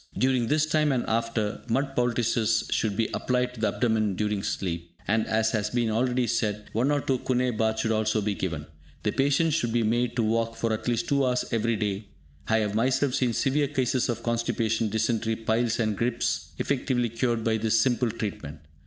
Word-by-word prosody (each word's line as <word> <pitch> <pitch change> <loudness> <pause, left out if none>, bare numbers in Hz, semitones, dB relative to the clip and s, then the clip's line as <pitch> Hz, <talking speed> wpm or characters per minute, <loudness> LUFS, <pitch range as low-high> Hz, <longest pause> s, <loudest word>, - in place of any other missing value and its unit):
During 130 -2 +2
this 155 +3 +2
time 155 -1 +2
and 125 -3 0
after, 115 -2 -1
mud 135 +3 0
poultices 115 -2 +1
should 105 -3 0
be 115 - +1
applied 125 0 0
to 120 - -11
the 110 - +2
abdomen 110 -4 +1
during 105 0 -1
sleep; 85 -4 -4
and, 110 +3 +1
as 110 0 +1
has 105 -1 0
been 120 -1 0
already 125 +2 +1
said, 105 -2 -2
one 120 +5 +1
or 145 -1 +2
two 130 -2 0
"Kuhne 125 -1 0
baths" 110 0 +1
should 110 - 0
also 110 0 +1
be 105 0 -1
taken. 85 -6 -3 0.4
The - - +1
patient 145 +4 +2
should 120 -7 0
be 120 0 +2
made 120 +2 0
to 120 - +1
walk 115 +1 0
for 115 0 -1
at 110 - -4
least 120 -1 0
two 140 -1 +2
hours 125 -1 +1
every 115 0 +1
day. 105 -1 -2 0.4
I 110 - +3
have 105 -1 -1
myself 130 +4 +1
seen 125 -3 +1
severe 140 +4 +1
cases 130 -2 0
of 120 - -2
constipation, 115 -1 0
dysentery, 110 +1 0
piles 115 +1 0
and 110 -2 +1
gripes 115 +3 -1
effectively 125 -3 0
cured 115 0 -1
by 110 -1 +1
this 110 0 +2
simple 120 0 +2
treatment. 100 -9 -5
115 Hz, 195 wpm, -26 LUFS, 110-125 Hz, 0.4 s, I